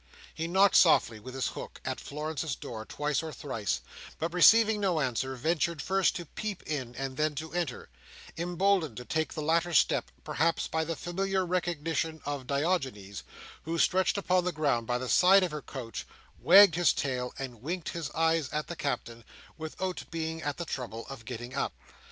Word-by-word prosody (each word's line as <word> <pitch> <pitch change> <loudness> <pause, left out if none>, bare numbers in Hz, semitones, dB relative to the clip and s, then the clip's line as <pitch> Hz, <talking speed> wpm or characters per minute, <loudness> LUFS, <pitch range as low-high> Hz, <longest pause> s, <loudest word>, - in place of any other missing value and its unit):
He 165 +1 -3
knocked 190 +3 +5
softly, 120 -9 +5
with 130 +4 -9
his 135 - 0
hook, - - -8
at - - -3
Florence's 150 -1 -4
door, 110 -2 -7
twice 150 -1 -1
or 160 -1 -6
thrice; 115 -10 -3 0.4
but, 165 +2 -3
receiving 220 +4 +6
no 185 -5 +1
answer, 130 -1 -1
ventured 160 +4 0
first 190 +5 +1
to 175 - -5
peep 210 +5 -5
in, 130 -6 -4
and 135 0 -4
then 150 -1 +1
to 160 +3 -6
enter: 170 -8 -3 0.5
emboldened 175 - +1
to 125 - -7
take 160 +3 -1
the 155 - -3
latter 170 +2 +1
step, - - +3
perhaps, 165 +2 0
by 160 0 -1
the 165 +1 -3
familiar 190 +4 -1
recognition 165 -2 -1
of 140 -3 -4
Diogenes, 135 - -1 0.4
who, 165 +1 -3
stretched 190 +3 +2
upon 185 -2 +2
the 180 - 0
ground 140 -8 0
by 120 - +1
the 130 +1 -4
side 190 +7 +6
of 180 - -1
her 150 -1 -5
couch, 125 -5 -7 0.3
wagged 200 -3 +8
his 175 +1 +3
tail, 125 -2 -2
and 125 -5 -6
winked 170 +5 -3
his 165 -4 -4
eyes 160 -3 +2
at 150 0 -2
the 170 - -6
Captain, 120 -5 -3 0.3
without 170 +4 -4
being 160 0 -3
at 145 -1 -3
the 170 - -4
trouble 120 -6 -5
of 130 -5 -9
getting 120 +1 -6
up. 140 - -1
160 Hz, 180 wpm, -29 LUFS, 130-175 Hz, 0.5 s, wagged